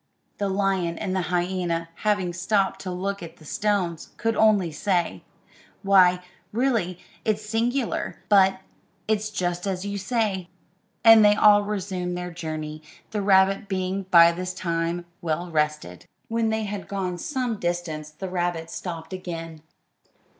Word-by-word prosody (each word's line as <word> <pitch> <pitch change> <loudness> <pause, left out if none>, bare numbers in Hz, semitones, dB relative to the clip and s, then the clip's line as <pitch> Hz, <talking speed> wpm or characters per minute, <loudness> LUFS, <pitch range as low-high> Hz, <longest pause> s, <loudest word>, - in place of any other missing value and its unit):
The 200 -1 0
lion 190 -3 0
and 190 -3 -2
the 190 - +1
hyena, 175 -2 -1
having 205 -5 0
stopped 195 +2 0
to 190 - -5
look 195 +2 -3
at 170 -1 -9
the 155 - -16
stones, 185 -3 -1
could 225 -1 0
only 205 -6 +4
say, 170 - -1 0.6
"Why, 180 -2 +5 0.3
really, 225 -7 0 0.3
it's 215 -1 -1
singular; 230 +3 -1
but 190 -2 +4 0.5
it's 215 0 0
just 180 -2 -2
as 190 0 -2
you 200 0 -3
say;" 195 -4 -1 0.5
and 225 -1 +9
they 210 0 +6
all 210 -1 +6
resumed 190 -3 -3
their 180 0 -5
journey, 155 -2 -5 0.3
the 210 -2 -1
rabbit 195 0 +4
being 190 0 -2
by 170 -2 +8
this 180 +1 -5
time 170 0 -2 0.2
well 170 +1 -2
rested. 150 - -2 0.2
When 225 0 +1
they 220 0 0
had 205 -1 -5
gone 185 -3 -3
some 250 - -2
distance 175 -3 -3
the 155 +5 -7
rabbit 175 -2 -2
stopped 165 -1 -6
again. 165 -3 -6
185 Hz, 145 wpm, -25 LUFS, 175-205 Hz, 0.6 s, and